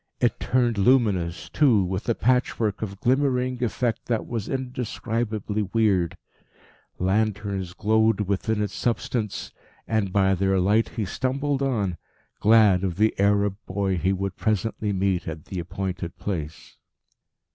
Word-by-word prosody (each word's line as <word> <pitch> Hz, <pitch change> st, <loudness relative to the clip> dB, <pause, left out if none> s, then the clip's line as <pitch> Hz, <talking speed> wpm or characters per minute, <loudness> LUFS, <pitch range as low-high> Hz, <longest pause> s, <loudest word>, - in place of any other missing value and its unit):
It 120 Hz, -2 st, +1 dB
turned 120 Hz, -4 st, +1 dB
luminous 100 Hz, -8 st, +2 dB
too, 125 Hz, -10 st, +3 dB
with 95 Hz, +5 st, -3 dB
a 115 Hz, -, +2 dB
patchwork 120 Hz, -4 st, +1 dB
of 100 Hz, -3 st, -5 dB
glimmering 125 Hz, -1 st, +1 dB
effect 120 Hz, 0 st, -1 dB
that 115 Hz, -2 st, 0 dB
was 115 Hz, -4 st, -4 dB
indescribably 115 Hz, -4 st, -2 dB
weird; 100 Hz, -7 st, +2 dB, 0.8 s
lanterns 100 Hz, -1 st, -1 dB
glowed 110 Hz, +1 st, +2 dB
within 105 Hz, +2 st, 0 dB
its 100 Hz, -2 st, -4 dB
substance, 115 Hz, -2 st, -2 dB, 0.4 s
and 110 Hz, -4 st, 0 dB
by 95 Hz, 0 st, +3 dB
their 95 Hz, +1 st, +1 dB
light 105 Hz, +5 st, +2 dB
he 115 Hz, -3 st, -3 dB
stumbled 135 Hz, +7 st, -1 dB
on, 105 Hz, -10 st, 0 dB, 0.4 s
glad 105 Hz, -4 st, +5 dB
of 90 Hz, -3 st, -1 dB
the 110 Hz, +4 st, +3 dB
Arab 100 Hz, 0 st, +2 dB
boy 95 Hz, 0 st, 0 dB
he 95 Hz, +3 st, +1 dB
would 95 Hz, -1 st, -2 dB
presently 110 Hz, 0 st, -1 dB
meet 95 Hz, -2 st, 0 dB
at 80 Hz, -1 st, -6 dB
the 95 Hz, -, -5 dB
appointed 90 Hz, 0 st, -4 dB
place. 80 Hz, -6 st, -5 dB
105 Hz, 135 wpm, -25 LUFS, 95-115 Hz, 0.8 s, glad